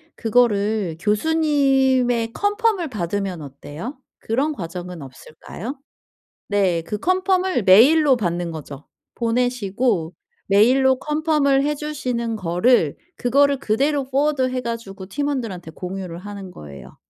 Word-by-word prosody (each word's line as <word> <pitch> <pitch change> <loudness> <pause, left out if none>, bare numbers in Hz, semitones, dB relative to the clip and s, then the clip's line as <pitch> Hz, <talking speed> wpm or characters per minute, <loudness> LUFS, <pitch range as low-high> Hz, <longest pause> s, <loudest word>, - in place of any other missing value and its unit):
그거를 215 -6 +1
교수님의 265 - +2
컨펌을 410 - 0
받으면 195 -4 -3
어때요? 145 - -8 0.2
그런 275 +7 -1
과정은 175 - -7
없을까요? 160 - -9 0.7
네. 190 -5 +1
그 210 +5 -5
컨펌을 370 - +1
메일로 260 +8 +6
받는 175 -4 -2
거죠. 150 -2 -9 0.3
보내시고 230 -6 0 0.3
메일로 255 +6 +4
컨펌을 300 -3 +1
해 295 +1 +1
주시는 250 -6 -3
거를 180 - +2 0.2
그거를 280 +3 +2
그대로 275 +5 +1
포워드 270 0 +1
해 255 0 -2
가지고 205 -5 -6
팀원들한테 230 - -3
공유를 180 0 -6
하는 200 -1 -8
거예요. 70 - -12
230 Hz, 275 characters per minute, -21 LUFS, 185-275 Hz, 0.7 s, 메일로